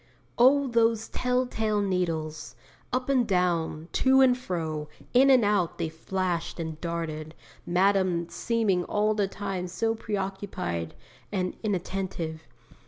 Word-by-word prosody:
"' - - -35
Oh 275 +3 +6
those 230 -2 +2
tell 250 0 0
tale 220 -3 -1
needles! 165 -6 -2 0.4
Up 255 0 -1
and 255 -4 +2
down, 170 -4 0
to 265 0 +4
and 260 -2 +6
fro, 160 -10 -4 0.2
in 265 +2 +6
and 255 -5 +6
out 200 -5 +1
they 160 - -2
flashed 175 +1 -3
and 160 -1 -5
darted, 165 -2 -4 0.3
Madame 185 -1 +2
seeming 195 0 0
all 210 +1 +1
the 205 -2 +1
time 195 -2 -4
so 225 +6 0
preoccupied 195 - -4 0.4
and 185 -3 -1
inattentive! 185 -5 -3
190 Hz, 130 wpm, -27 LUFS, 170-225 Hz, 0.4 s, Oh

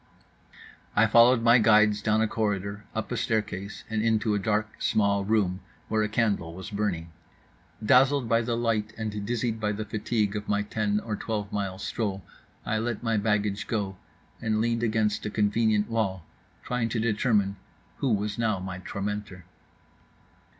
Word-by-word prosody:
I 115 - +5
followed 115 +2 +6
my 120 +1 +6
guides 105 -1 +5
down 110 +1 +2
a - - +2
corridor, 105 -1 -2
up 110 - -3
a 125 - -1
staircase, 105 -3 -2
and 110 -1 -1
into 110 -1 +2
a 105 - +1
dark, 110 +1 -1
small 100 -2 +2
room 100 -3 +1 0.3
where 110 -1 +1
a 105 - 0
candle 105 -7 0
was 95 +4 -8
burning. 95 -6 -2 0.7
Dazzled 135 +2 +4
by 115 +1 +3
the 115 0 -1
light 110 -2 0
and 105 -2 -3
dizzied 115 -1 -1
by 105 -1 0
the 105 +1 -4
fatigue 105 0 -1
of 105 0 -5
my 105 0 +1
ten 105 0 0
or 110 -2 -3
twelve 105 -2 -4
mile 100 -2 -2
stroll, 100 -2 -3 0.4
I 110 0 0
let 115 0 -3
my 115 -2 +1
baggage 105 -2 0
go; 100 -4 -2 0.5
and 110 -2 0
leaned 115 +1 +1
against 110 -2 0
a - - -2
convenient 105 0 +2
wall, 100 -6 -1 0.4
trying 125 -2 -1
to 115 - -1
determine 105 -3 +1 0.4
who 135 - 0
was 105 0 -1
now 110 -3 +1
my 95 0 -6
tormentor. 100 -1 -5
105 Hz, 165 wpm, -27 LUFS, 100-115 Hz, 0.7 s, followed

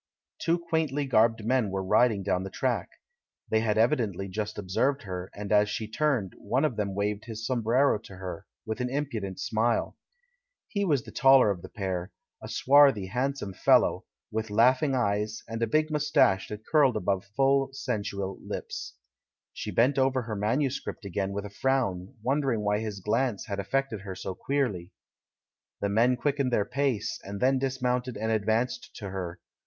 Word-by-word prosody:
Two 165 +1 +2
quaintly 160 -4 -1
garbed 115 -3 +3
men 125 -3 +2
were 95 0 -2
riding 105 +1 +3
down 90 -2 0
the 95 - -5
track. - - -1 0.6
They 110 - +4
had 110 -1 0
evidently 110 - +1
just 105 +2 -4
observed 125 +9 0
her, 90 -2 -5
and 100 -1 -6
as 105 0 +4
she 110 0 -3
turned, 115 - 0
one 125 +8 +1
of 130 - -1
them 100 -2 -2
waved 105 +1 -1
his 115 -1 -6
sombrero 120 +1 +2
to 100 -3 -12
her, 90 -2 -7 0.2
with 110 +3 -3
an 125 - -1
impudent 120 -9 -3
smile. 115 +2 0 0.7
He 200 -1 -1
was 145 - +1
the - - -11
taller 135 -6 +6
of 90 -3 -4
the - - -10
pair, 95 -1 -3 0.3
a - - -7
swarthy, 135 -7 +5
handsome 125 -2 -2
fellow, - - +3 0.3
with 110 0 -2
laughing 130 +6 +3
eyes, 105 -2 -1
and 115 0 -5
a 115 - +2
big 155 +6 +1
moustache 150 -10 +3
that 105 +1 -8
curled 140 -7 +4
above 95 -1 -1
full, 135 0 +3
sensual 100 -7 -3
lips. - - -6 0.6
She - - -5
bent 130 +4 +3
over 130 -1 +2
her 110 -2 -4
manuscript 120 +2 -1
again 100 +1 -2
with 100 +1 -4
a 105 - -8
frown, 120 -4 -1
wondering 135 -3 +1
why 105 0 +1
his 105 -3 -5
glance 110 +1 0
had 100 -1 -4
af 100 0 -5
fected 135 -4 -1
her 95 -2 -6
so 95 - -5
queerly. 105 -9 -2 0.9
The 100 - -1
men 115 +5 +3
quickened 140 -1 0
their 105 -4 +2
pace, 125 -4 -1
and 100 +1 -6
then 130 +3 +3
dis 130 -1 -3
mounted 125 0 0
and 110 +1 -1
advanced 110 +3 -1
to 100 -4 -6
her. 90 -2 -5
110 Hz, 175 wpm, -28 LUFS, 100-135 Hz, 0.9 s, taller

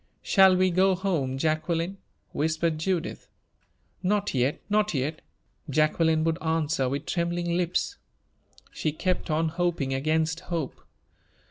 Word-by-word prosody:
"Shall 190 -2 +6
we 185 0 +3
go 190 +2 +3
home, 165 -9 -1
Jacqueline?" 165 +5 -1 0.3
whispered 160 +1 0
Judith. 170 0 -2 0.7
"Not 205 +2 0
yet 130 +2 +1
not 210 -3 +1
yet!" 145 +4 -2 0.5
Jacqueline 155 +2 +2
would 165 +2 0
answer, 160 -4 0
with 140 +3 -3
trembling 170 0 -1
lips. 180 - -1 0.7
She 155 - -2
kept 185 +2 -1
on 160 +1 +1
hoping 170 -5 -1
against 160 +4 0
hope. 170 -6 -4
165 Hz, 120 wpm, -27 LUFS, 155-180 Hz, 0.7 s, Shall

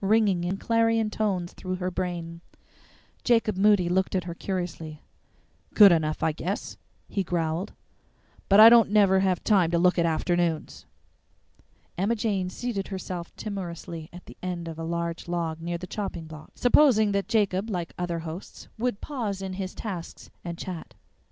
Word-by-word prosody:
ringing 200 -3 +3
in 180 +2 -2
clarion 225 0 +1
tones 190 -5 -1
through 185 -1 -4
her 180 0 -3
brain. 170 -2 -4 0.8
Jacob 225 -4 +2
Moody 200 -2 +4
looked 190 +2 0
at 185 - 0
her 170 -1 -5
curiously. 170 -4 -5 0.7
"Good 205 -3 +9
enough, 155 -2 0
I 160 - +3
guess," 180 +6 -4 0.3
he 200 - -2
growled; 170 +1 -2 0.8
"but 200 +1 +6
I 220 - +12
don't 230 -2 +7
never 200 -2 +4
have 190 -2 +1
time 190 -6 +3
to 170 - +1
look 180 +1 +3
at 170 - +3
afternoons." 165 0 -1 1.1
Emma 205 +5 +1
Jane 205 -5 -1
seated 200 -1 -4
herself 185 -3 -6
timorously 170 -5 -6
on 180 - -10
the - - -13
end 175 -2 -4
of 165 -1 -7
a - - -4
large 170 0 -3
log 165 -2 -2
near 170 +1 -3
the 185 - -7
chopping 180 -3 -5
block, 155 -1 -12
supposing 245 -5 +4
that 200 0 -1
Jacob, 210 -2 +1
like 175 -5 -3
other 175 -1 -3
hosts, 165 +3 -9
would 245 -3 -1
pause 225 -9 -3
in 190 -1 -5
his 185 -1 -5
tasks 185 -7 -7
and 170 -1 -5
chat. 180 -3 -7
185 Hz, 165 wpm, -26 LUFS, 170-205 Hz, 1.1 s, I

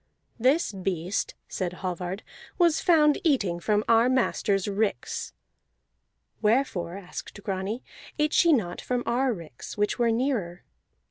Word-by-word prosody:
"This 265 +7 +3
beast," 185 -1 -2
said 180 -2 -3
Hallvard, 180 +1 -4 0.3
"was 340 -3 +3
found 300 -4 +4
eating 205 - +2
from 210 +3 +1
our 230 +2 +5
masters 210 -6 +1
ricks." 200 - -2 1.1
"Wherefore," 210 -6 +1
asked 200 +1 -8
Grani, 195 +4 -3 0.3
"ate 300 0 +1
she 340 - +5
not 200 - +1
from 250 -1 -1
our 255 +2 +1
ricks, 165 - -8
which 210 +4 0
were 235 -1 +3
nearer?" 225 -8 -1
210 Hz, 125 wpm, -27 LUFS, 185-255 Hz, 1.1 s, our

